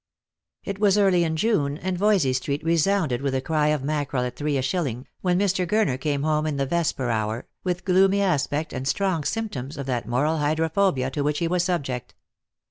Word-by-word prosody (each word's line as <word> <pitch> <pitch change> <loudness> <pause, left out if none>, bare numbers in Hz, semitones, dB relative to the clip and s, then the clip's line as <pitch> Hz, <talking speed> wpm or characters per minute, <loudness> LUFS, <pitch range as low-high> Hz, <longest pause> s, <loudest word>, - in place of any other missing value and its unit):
It 200 0 -5
was 205 -1 +4
early 190 -4 +4
in 160 -1 -1
June, 155 -7 +1
and 185 +2 -3
Voysey 185 -8 +2
street 140 +3 -2
resounded 165 -5 +1
with 140 -1 -1
the 130 - +1
cry 150 +1 +1
of 150 -3 +1
mackerel 145 -3 -1
at 125 0 -4
three 145 0 -1
a - - 0
shilling, 135 -4 -2 0.2
when 180 -1 +1
Mr. 185 -2 +1
Gurner 175 -10 +1
came 145 -1 -1
home 155 0 +1
in 150 -2 -2
the 140 - 0
vesper 140 -5 0
hour, 110 +1 -2 0.2
with 180 -1 -2
gloomy 195 +1 +4
aspect 155 -4 0
and 130 0 -4
strong 185 -1 0
symptoms 150 - -4
of 140 - -4
that 120 -4 -2
moral 150 +7 +1
hydrophobia 155 -2 +1
to 145 - -2
which 150 +1 0
he 170 - 0
was 175 0 +1
subject. 135 -9 -3
155 Hz, 200 wpm, -24 LUFS, 135-180 Hz, 0.2 s, was